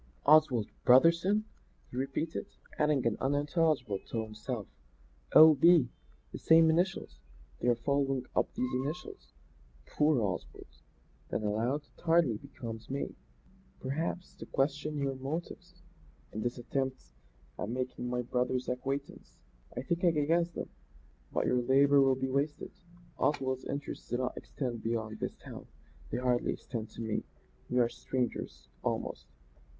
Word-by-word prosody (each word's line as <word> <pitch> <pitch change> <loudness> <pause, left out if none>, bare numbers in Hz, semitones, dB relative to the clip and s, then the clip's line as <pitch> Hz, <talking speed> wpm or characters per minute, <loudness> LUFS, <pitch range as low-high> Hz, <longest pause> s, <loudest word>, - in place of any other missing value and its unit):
"Oswald 145 -7 +5 0.2
Brotherson!" 170 +10 +5 0.5
he - - -9
repeated; 135 +5 -2 0.3
adding 150 -4 +2
in 115 -2 +1
unintelligible 145 - +1
tones - - -23
to 115 -1 -1
himself 110 +1 -5 0.7
"O. 155 0 +10
B. 160 -3 +5 0.4
The - - -7
same 160 0 +6
initials! 170 - -1 0.4
They - - -1
are 120 - +5
following 135 +1 0
up - - +1
these 125 0 -1
initials. 145 +8 -4 0.5
Poor 150 - +2
Oswald." 100 -5 -3 0.6
Then 110 - -2
aloud: 115 +8 0
"It - - -20
hardly 165 -9 +3
becomes 115 -3 -8
me, 135 +1 -3 0.7
perhaps, 160 +7 -3
to - - -9
question 145 +2 -1
your 140 -1 0
motives 140 +6 -6 0.5
in 110 - -3
this 120 +2 -2
attempt 130 - -3 0.5
at 105 - -3
making 125 0 -3
my 125 0 -1
brother's 125 +1 -1
acquaintance. 135 - -4 0.4
I 125 - -2
think 170 +4 -1
I 175 - +6
can 150 -2 +1
guess 170 +2 +2
them; 170 - -6 0.6
but - - 0
your 125 0 +2
labour 140 +3 +5
will 135 -1 +4
be 130 0 -2
wasted. 145 +2 -1 0.5
Oswald's 130 -3 0
interests 140 +1 -5
do 120 - 0
not 125 0 -2
extend 120 -5 -4
beyond 110 -1 -2
this - - -3
town; - - -10 0.4
they - - -2
hardly 125 -1 +1
extend 115 -3 -6
to 115 - -9
me. 110 -1 -2 0.5
We 125 - 0
are 120 -1 +5
strangers, 120 - -4
almost. - - -3
130 Hz, 145 wpm, -31 LUFS, 120-150 Hz, 0.7 s, O